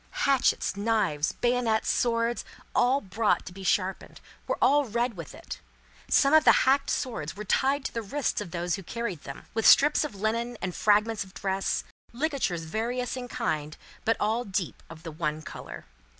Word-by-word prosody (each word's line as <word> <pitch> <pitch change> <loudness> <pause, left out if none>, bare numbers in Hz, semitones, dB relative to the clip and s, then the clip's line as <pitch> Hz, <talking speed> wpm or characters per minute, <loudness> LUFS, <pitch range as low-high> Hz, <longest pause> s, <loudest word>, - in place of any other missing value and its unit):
Hatchets, 270 -8 +2
knives, 200 -8 0
bayonets, 240 -3 +1
swords, 235 0 0 0.3
all 260 +3 +3
brought 205 +3 0
to 180 - -9
be 195 +1 -9
sharpened, 190 0 -1 0.3
were - - -1
all 290 +1 +4
red 235 0 -1
with 165 -4 -8
it. 335 - -8 0.5
Some 275 +1 +4
of 315 - +7
the - - +8
hacked 275 +2 +3
swords 225 - -2
were 210 - -6
tied 270 +6 +1
to - - -3
the 230 - -2
wrists 270 +7 -2
of - - -6
those 175 0 -2
who 195 - -2
carried 195 -3 -5
them, 140 - -8
with 225 - +2
strips 295 +2 +6
of 295 -8 -5
linen 230 +4 -2
and 185 -2 -3
fragments 210 +1 +2
of 190 0 -17
dress: 195 0 -1 0.3
ligatures 250 - -1
various 235 +10 -2
in 250 -1 -5
kind, 155 -8 -3 0.3
but 225 - +2
all 220 +3 +1
deep 190 -5 -3
of 165 -1 -12
the 165 - -6
one 155 -1 -3
colour. - - -9
220 Hz, 180 wpm, -27 LUFS, 185-250 Hz, 0.5 s, the